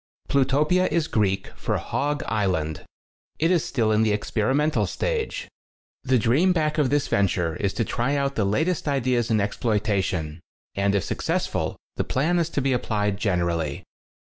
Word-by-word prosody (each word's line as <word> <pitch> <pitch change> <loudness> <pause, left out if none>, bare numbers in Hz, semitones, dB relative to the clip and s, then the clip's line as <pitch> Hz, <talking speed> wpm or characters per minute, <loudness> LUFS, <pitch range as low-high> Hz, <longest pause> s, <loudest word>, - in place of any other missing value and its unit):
Plutopia 150 +7 +3
is 165 -2 +1
Greek 100 -5 0
for - - -2
Hog: 145 0 -2
Island. 90 -8 -1 0.5
It 165 +3 +2
is 175 -4 +3
still 115 -5 0
in 110 0 +3
the 110 -1 +3
experimental 130 +9 +1
stag'e. - - -2 0.6
The 130 -1 +3
dream 135 - +3
back 155 -2 0
of 140 -4 +3
this 145 0 +1
venture 90 -5 +1
is 100 -2 0
to 115 - -1
try 125 +7 -1
out 140 -1 0
the 110 - 0
latest 155 - 0
ideas 125 -4 +1
in 110 - +3
exploita 105 -1 0
tion, 80 -4 -3 0.3
and 100 0 +1
if 100 - +1
successful - - -2 0.2
the - - +1
plan 165 +7 +1
is 170 -1 0
to 140 - -2
be 135 -1 +2
applied 105 -5 0
generally. 85 -7 -1
120 Hz, 165 wpm, -24 LUFS, 100-150 Hz, 0.6 s, Plutopia